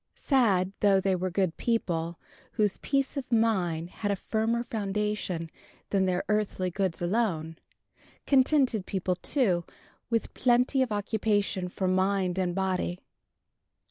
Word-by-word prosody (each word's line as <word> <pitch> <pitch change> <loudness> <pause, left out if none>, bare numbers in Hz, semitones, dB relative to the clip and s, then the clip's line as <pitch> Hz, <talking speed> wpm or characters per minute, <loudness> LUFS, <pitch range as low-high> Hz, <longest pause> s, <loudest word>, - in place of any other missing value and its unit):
Sad, 200 -9 +2
though 200 -2 +4
they 190 0 +1
were 185 +1 -2
good 185 -2 0
people, 170 -8 -1 0.4
whose 210 -3 +1
peace 275 0 -1
of 260 -2 -5
mind 180 -8 +1
had 205 - -3
a 200 - +2
firmer 225 +4 -1
foundation 210 -6 -2 0.4
than 190 -2 +2
their 180 0 0
earthly 210 -3 0
goods 185 -2 -1
alone; 175 -5 -1 0.7
contented 260 -6 +3
people, 185 -2 -1
too, 185 - +1 0.5
with 230 -2 -1
plenty 250 +2 +3
of 255 -3 0
occupation 205 -2 0
for 185 +1 -2
mind 185 0 +1
and 180 -2 -1
body. 185 -2 -1
195 Hz, 130 wpm, -28 LUFS, 180-225 Hz, 0.7 s, though